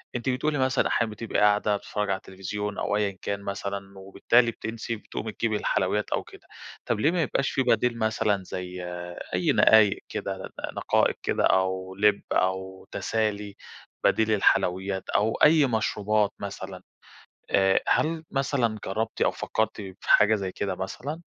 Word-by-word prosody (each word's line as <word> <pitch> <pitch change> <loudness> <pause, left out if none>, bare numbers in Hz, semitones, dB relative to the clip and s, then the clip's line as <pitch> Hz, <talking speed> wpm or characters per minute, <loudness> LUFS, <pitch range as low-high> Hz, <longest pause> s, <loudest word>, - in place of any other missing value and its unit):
أنتِ 120 +2 -1
بتقولي 145 +4 0
مثلًا 130 0 +2
أحيانًا 115 -2 0
بتبقي 110 +1 -2
قاعدة 105 0 +3
بتتفرّجي 105 0 -3
على 95 - +1
التليفزيون، 100 +2 -5
أو - - -1
أيًا 100 -2 -1
كان 100 0 -2
مثلًا، 100 0 -5
وبالتالي 115 +5 +2
بتنسي، 115 +1 -5
بتقومي 110 0 -6
تجيبي 110 0 -1
الحلويّات 105 +1 0
أو - - 0
كده، - - -16 0.4
طب - - -1
ليه 150 - +3
ما 175 -1 0
يبقاش 135 -1 0
في - - +1
بديل 120 -1 +2
مثلًا 110 -3 +1
زي 90 0 -6 0.5
أي - - +2
نقايق 105 -2 +5
كده، - - -5 0.2
نقائق - - +1
كده - - 0
أو 95 0 +1
لب 105 +1 +3
أو 95 0 -1
تسالي، 105 -2 -2 0.5
بديل 110 - +3
للحلويّات 95 -1 +1
أو 110 +2 +2
أي 150 -1 +7
مشروبات 105 -3 +1
مثلًا، 95 -2 -7 0.7
آآ، 95 -1 +4
هل 160 +1 +1
مثلًا 130 -5 0
جرّبتِ 110 +4 -3
أو - - +4
فكرتِ 110 -1 -2
في 95 -2 -8
حاجة 105 +1 +6
زي 95 -3 -3
كده 95 0 -3
مثلًا؟ 140 - -5
105 Hz, 150 wpm, -26 LUFS, 95-115 Hz, 0.7 s, أي